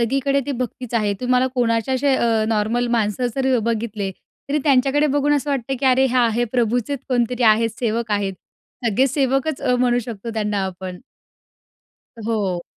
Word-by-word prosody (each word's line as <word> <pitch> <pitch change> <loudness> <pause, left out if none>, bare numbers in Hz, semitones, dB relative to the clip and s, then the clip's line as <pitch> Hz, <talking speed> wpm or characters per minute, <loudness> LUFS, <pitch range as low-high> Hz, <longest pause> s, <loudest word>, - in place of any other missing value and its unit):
सगळीकडे 275 +4 +1
ते 285 - -1
भक्तीच 250 -1 -5
आहे. 210 -3 +1
तुम्हाला 250 0 +2
कोणाच्या 235 +1 +1
असे 270 +1 +2
अ, 225 -3 +2
नॉर्मल 225 +3 0
माणसं 220 +3 0
जर 265 -1 +2
बघितले, 215 -3 -2 0.4
तरी 295 - +1
त्यांच्याकडे 280 +1 +3
बघून 290 0 +1
असं 290 0 -1
वाटतं 270 -1 -1
की, 270 - +1
"अरे, 260 +1 +4
हा, 245 -2 +4
हे 240 +1 +1
प्रभूचेच 245 +3 0
कोणतरी 245 -1 0
आहेत, 225 0 +4
सेवक 230 -1 -1
आहेत." 200 -1 0 0.5
सगळे 230 +5 +3
सेवकच 270 +2 0
अ, 250 -2 +2
म्हणू 245 -1 +2
शकतो 230 -1 -6
त्यांना 210 -2 -1
आपण. 185 -1 -6 1.2
अ, - - -8
हो. 195 -6 -1
245 Hz, 165 wpm, -21 LUFS, 220-265 Hz, 1.2 s, अरे